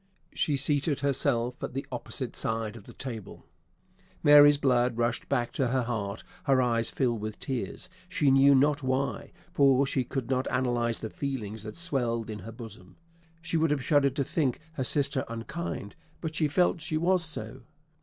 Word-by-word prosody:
she 145 -2 +1
seated 145 0 0
herself 125 -3 0
at - - -5
the 135 +1 -3
opposite 125 +1 -5
side 110 -1 -1
of 110 -3 -12
the - - -12
table. 115 -7 -7 0.8
Mary's 145 -1 +8
blood 125 -4 +2
rushed 120 0 -1
back 120 -4 0
to 135 - 0
her 130 +1 +1
heart; 105 -4 -3 0.2
her 135 -2 +4
eyes 115 -2 +1
filled 120 -5 -1
with 110 0 -5
tears, 135 +6 -4 0.2
she 145 -6 +2
knew 135 +1 +6
not 145 +2 +3
why; 130 +1 -2 0.2
for 140 -1 +4
she 135 -1 0
could 130 0 -4
not 130 0 0
analyse 120 -2 0
the 110 - -4
feelings 110 -7 -4
that 110 +6 -8
swelled 120 -10 -1
in 105 - -6
her 110 +5 -8
bosom. 110 -6 -11 0.5
She 165 -1 -1
would 160 0 +2
have 145 -3 0
shuddered 140 -3 +3
to 140 - +1
think 135 -2 -1
her 135 - -2
sister 140 0 +1
unkind, 115 - -5 0.2
but 160 -2 -4
she 155 -1 +2
felt 175 +2 +2
she 155 0 -1
was 175 +2 +2
so. 130 -6 -4
130 Hz, 175 wpm, -28 LUFS, 115-145 Hz, 0.8 s, Mary's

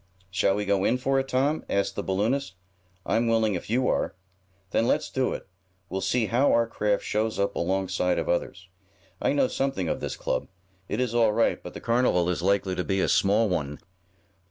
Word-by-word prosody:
"Shall 95 +1 +2
we 105 0 -2
go 100 -1 +1
in 125 - +2
for 135 +1 +1
it, 135 - -2
Tom?" 140 +4 +1
asked 100 0 0
the - - -2
balloonist. 105 +4 -1 0.5
"I'm 115 +1 +1
willing 110 -2 +2
if 90 - -5
you 125 +3 +2
are." - - 0 0.6
"Then 115 - +2
let's - - 0
do 130 -1 0
it. - - -7 0.4
We'll 95 +1 -3
see 110 +5 +1
how 125 +6 +2
our 115 - +4
craft 105 -3 -1
shows 110 +1 -1
up 100 0 0
alongside 95 0 0
of - - -2
others. 85 +1 -2 0.5
I - - +2
know 145 -2 +3
something 135 -12 -1
of - - -1
this - - -4
club. - - -2 0.4
It 105 - -2
is 125 -2 0
all 115 -3 +3
right, 115 +1 +1
but 90 - -9
the - - -7
carnival 115 -7 +2
is 85 - -2
likely 95 0 +1
to 90 - -2
be 95 +1 -1
a - - +2
small 105 +3 +3
one. 75 -6 -2
105 Hz, 205 wpm, -26 LUFS, 95-120 Hz, 0.6 s, our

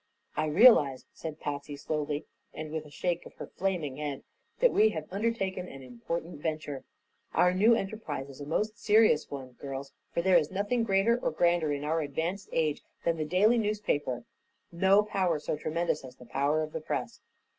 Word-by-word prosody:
"I 155 - 0
realize," 150 - +6
said 160 -1 -7
Patsy, 145 0 -4
slowly 150 0 -3 0.3
and 155 -1 -6
with 155 -1 -4
a - - -13
shake 175 +3 -2
of - - -17
her - - -7
flaming 175 -8 -2
head, 145 -2 -4 0.4
"that - - +5
we 215 +1 +5
have 160 -6 -5
undertaken 195 -4 -1
an 135 -4 -10
important 145 +6 -5
venture. 155 -4 -3 0.5
Our 180 0 +5
new 215 +5 +5
enterprise 195 - -4
is 140 0 -11
a 145 - -6
most 215 +7 -1
serious 215 -7 +4
one, 135 -2 -7
girls, 135 0 -6 0.2
for 170 - -1
there 185 -1 +6
is 150 - -3
nothing 205 +5 0
greater 220 +3 +3
or - - 0
grander 170 -1 +2
in 145 0 -2
our 160 +2 0
advanced 165 +7 -3
age 155 -2 0 0.2
than 165 -1 +1
the 155 - -1
daily 205 +9 +4
newspaper; 150 - -1 0.5
no 190 +4 +4
power 185 -5 0
so 150 - -2
tremendous 155 0 -1
as 130 -1 -10
the 125 - -14
Power 145 +5 +1
of 155 - -6
the - - -3
Press." - - -4
160 Hz, 185 wpm, -30 LUFS, 145-195 Hz, 0.5 s, realize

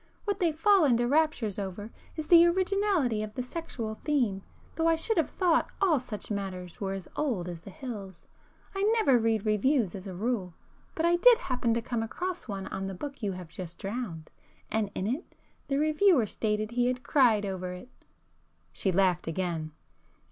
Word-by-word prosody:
What 405 -2 -1
they 345 -3 +3
fall 365 +4 +4
into 240 -4 +3
raptures 280 -8 +1
over 200 +3 -5 0.2
is 310 - -4
the 335 +1 +8
originality 370 - +1
of 215 0 -6
the 250 - -2
'sexual' 245 -7 -5
theme, 245 -10 +1 0.3
though 325 0 +1
I 330 - +5
should 440 +8 -1
have 325 - +2
thought 345 -3 +2
all 350 -8 +3
such 215 -4 -7
matters 185 -3 -5
were 195 -1 -1
as 195 -2 -6
old 230 -13 -1
as 170 -2 -6
the 180 - -11
hills. 195 -6 -8 0.5
I 390 - -2
never 420 - +4
read 225 -1 +1
reviews 215 - +2
as 195 0 -7
a 185 - -6
rule, 195 -4 -2 0.4
but 325 - 0
I 345 +1 +4
did 475 +6 +7
happen 250 - -1
to 230 - -1
come 235 -1 -2
across 355 +11 -4
one 195 -3 -4
on 195 0 -4
the 195 - -5
book 280 +5 -7
you 205 -2 -1
have 180 -2 -8
just 170 0 -8
drowned,—and 195 -1 -5
in 185 - -2
it, 260 - -3 0.3
the 275 - 0
reviewer 310 - +4
stated 215 +1 -1
he 245 0 +1
had 250 0 -2
cried 240 -8 +4
over 185 -2 -4
it!" 180 +8 -10 0.8
She 190 - 0
laughed 180 -2 +2
again. 165 -2 -2
230 Hz, 185 wpm, -29 LUFS, 195-310 Hz, 0.8 s, the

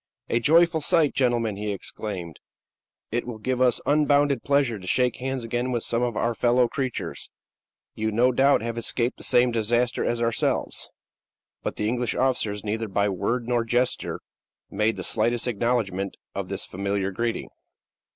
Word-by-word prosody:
"A 115 - +2
joyful 165 +5 +4
sight, 150 0 +2
gentlemen!" 120 -5 +1
he 105 0 -2
exclaimed. 95 -4 -6 0.7
"It 120 +2 -1
will 120 -3 -5
give 125 +3 -2
us 125 -2 +4
unbounded 145 -3 +3
pleasure 140 -6 +1
to 95 - -10
shake 125 +6 +2
hands 130 -1 -3
again 120 +2 -2
with 120 -2 -1
some 115 0 0
of 120 -3 -1
our 120 - +1
fellow 120 +3 +3
creatures. 130 0 -4 0.6
You, 110 0 -2
no 120 +4 +3
doubt, 135 -1 +3
have 115 0 -3
escaped 120 +1 -1
the - - -9
same 125 0 +4
disaster 120 +2 +1
as 120 - 0
ourselves." 115 -1 -1 0.7
But - - -3
the 105 - -1
English 120 0 -1
officers, 110 -6 0
neither 110 +1 -2
by 100 +1 +1
word 115 +6 -1
nor 120 -1 +1
gesture, 120 +2 -1 0.5
made 105 +3 +1
the - - -4
slightest 115 +2 0
acknowledgment 105 -5 -1 0.2
of 95 -2 -4
this 95 - -4
familiar 100 +1 -2
greeting. 115 +4 -2
120 Hz, 160 wpm, -25 LUFS, 105-125 Hz, 0.7 s, joyful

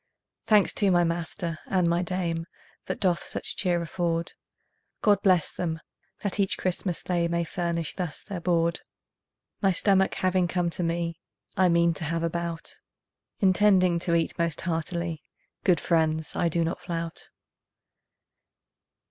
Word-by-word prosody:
Thanks 210 -3 +4
to 200 - +2
my 175 -1 +4
master 170 0 -2
and 185 -3 +2
my 170 +1 +2
dame 170 -2 -2 0.4
That - - -3
doth 180 -3 +1
such - - -2
cheer 180 -3 +1
afford; 170 0 -2 0.7
God 205 -2 +4
bless 185 -5 +3
them, 160 -2 -3 0.4
that 205 0 -2
each 195 -1 +1
Christmas 180 -1 -2
they 175 -2 +1
May 170 0 0
furnish 170 -2 -2
thus 175 -5 -5
their 200 -4 -5
board. 170 -1 +1 0.8
My 195 - +4
stomach 190 +1 +3
having 185 -1 +2
come 175 -1 0
to 180 - -1
me, 170 -1 -1 0.4
I 185 0 +4
mean 170 0 +4
to 160 - -5
have 165 +2 -1
a 165 - 0
bout, 170 -1 -4 0.6
Intending 185 -2 +4
to 170 -1 +1
eat 165 0 0
most 170 -3 0
heartily; 170 -1 -2 0.4
Good 180 -5 +4
friends, 160 -2 0
I 170 - +2
do 170 +1 +1
not 165 - -2
flout. 165 -1 -5
170 Hz, 150 wpm, -27 LUFS, 165-185 Hz, 0.8 s, Thanks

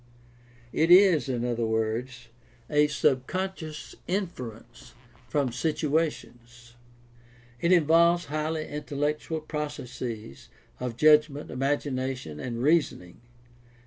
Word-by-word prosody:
It 160 +2 +2
is, 180 -5 +6
in 120 -2 -1
other 120 -2 -1
words, 115 +2 -2 0.4
a 150 0 +4
subconscious 155 +4 -2
inference 165 - -5 0.3
from 140 -4 0
situations. 125 -5 -2 0.9
It 170 - +1
involves 170 0 +4
highly 155 +1 -2
intellectual 150 +2 -3
processes 130 - -6 0.3
of 125 -2 -4
judgment, 150 0 +4
imagina 135 0 -1
tion, 75 -10 -9
and 120 +3 -4
reasoning. 145 - +1
145 Hz, 90 wpm, -27 LUFS, 120-155 Hz, 0.9 s, is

